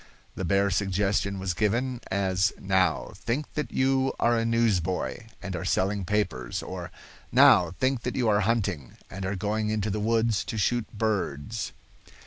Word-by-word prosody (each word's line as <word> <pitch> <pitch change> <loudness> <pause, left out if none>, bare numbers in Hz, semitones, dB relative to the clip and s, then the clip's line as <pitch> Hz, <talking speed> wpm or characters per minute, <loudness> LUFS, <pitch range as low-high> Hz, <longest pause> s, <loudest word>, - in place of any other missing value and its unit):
The - - -5
bare 100 +3 +2
suggestion 100 +1 0
was 95 -1 -2
given, 120 +6 0
as, 95 0 +1
"Now, 95 -3 +1
think 130 +6 -3
that 150 -6 -3
you 135 0 +2
are 120 0 +3
a 115 - +1
newsboy, 115 -2 0 0.2
and 95 -2 -4
are 90 - -4
selling 95 +1 0
papers," 65 -13 -1
or, - - -6 0.4
"Now 90 -1 +6
think 130 -1 +1
that 125 - -3
you 125 -3 +1
are 105 -1 +4
hunting 100 - -1 0.2
and 95 0 -4
are 95 - -2
going 105 +2 -1
into 110 -1 -1
the 105 - -2
woods 115 0 +1
to 110 - -4
shoot 120 +2 +1
birds." 105 -2 -2
105 Hz, 160 wpm, -27 LUFS, 95-115 Hz, 0.4 s, Now